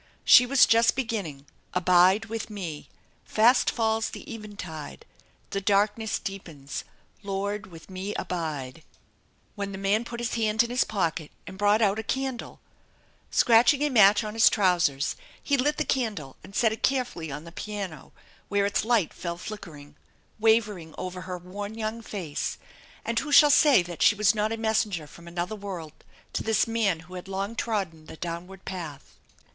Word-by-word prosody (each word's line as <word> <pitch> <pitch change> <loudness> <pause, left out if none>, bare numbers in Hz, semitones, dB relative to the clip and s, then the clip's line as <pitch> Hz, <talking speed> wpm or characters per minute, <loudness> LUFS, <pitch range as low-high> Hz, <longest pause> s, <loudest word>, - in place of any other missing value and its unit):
She 250 - +8
was 275 0 +6
just 230 +1 +4
beginning: 200 - -3 0.3
Abide 185 +4 +4
with 225 0 -5
me, 170 -9 -6 0.3
Fast 235 +4 +4
falls 225 -1 0
the - - -10
eventide, 185 - -8 0.5
The 195 - -2
darkness 205 +2 +1
deepens, 160 -8 -7 0.4
Lord, 200 0 -3
with 165 -3 -13
me 190 +2 -5
abide! 155 -6 -4 0.7
When 200 -1 -4
the 195 - -6
man 200 +3 +1
put 235 0 -7
his 240 0 -2
hand 220 0 +2
in 235 - -5
his 250 - +3
pocket 165 -6 -2 0.2
and - - -9
brought 205 +3 +3
out 205 +1 +2
a - - -3
candle. 265 +1 -3 0.7
Scratching 240 +5 +4
a 295 - +1
match 205 -3 +6
on 210 0 -5
his 225 +1 +6
trousers, 175 -8 +1 0.3
he 285 - +2
lit 290 +3 +1
the - - 0
candle 205 - -2
and 195 - -13
set 225 -2 +3
it 220 - -8
carefully 250 - -1
on 150 +2 -6
the 170 - -11
piano, 195 -6 -6 0.4
where 205 -1 +2
its 200 - 0
light 225 -6 +1
fell 170 -1 -5
nickering, 150 -8 -10 0.4
wavering 210 -7 +1
over 185 0 -5
her 185 -1 -5
worn 200 +4 -7
young 225 +1 -3
face; 180 -10 -4 0.5
and 230 0 0
who 300 - -5
shall 295 0 +8
say 290 - +6
that 175 -1 -8
she 210 - +6
was 210 0 +4
not 215 0 0
a 225 - -2
messenger 215 -7 0
from 170 +3 -14
another 175 +4 -3
world 185 -7 -7 0.4
to - - -1
this 220 -2 +2
man 215 -7 0
who 180 +3 -15
had 180 0 -7
long 195 +3 -3
trodden 190 -9 -3
the - - -10
downward 175 +3 -7
path 165 -7 -7
200 Hz, 170 wpm, -26 LUFS, 175-225 Hz, 0.7 s, She